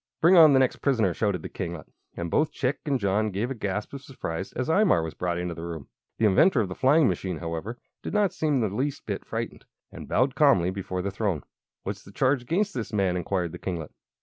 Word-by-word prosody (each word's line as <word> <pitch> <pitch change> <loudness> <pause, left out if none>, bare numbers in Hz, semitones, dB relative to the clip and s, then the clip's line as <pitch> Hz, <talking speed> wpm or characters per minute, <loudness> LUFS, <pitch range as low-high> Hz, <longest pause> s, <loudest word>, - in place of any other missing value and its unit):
"Bring 170 +3 +6
on 160 -4 +8
the - - +6
next 130 -1 +2
prisoner!" 115 -10 +1
shouted 95 -3 -1
the - - -6
kinglet, 85 -5 -5 0.3
and 85 -1 -4
both 155 +1 +2
Chick 135 0 -1
and 140 -3 +1
John 105 +2 +1
gave 105 +6 -2
a - - 0
gasp 105 -1 -4
of 140 - -6
surprise 95 -10 -5
as 130 - -2
Imar 160 - +3
was 80 - -5
brought 90 -1 -2
into 90 0 -3
the 85 - -8
room. 85 -4 -7 0.3
The 110 - +2
inventor 115 - +5
of 100 - -2
the - - -4
flying 135 - +4
machine, 90 -1 -2
however, 85 +8 -5 0.2
did - - -5
not 205 -3 +2
seem 150 -5 +1
the 110 - +1
least 135 +8 -3
bit - - -4
frightened, - - -5 0.3
and - - -9
bowed 130 +1 +2
calmly 115 - +4
before 95 -1 -4
the 100 - -2
throne. 100 -5 -1 0.4
"What's - - -5
the - - -14
charge 135 0 +2
against 190 - 0
this 120 -2 -4
man?" 95 -4 +1
inquired 90 -1 -1
the 90 - -8
kinglet. 85 -5 -4
105 Hz, 230 wpm, -26 LUFS, 90-135 Hz, 0.4 s, on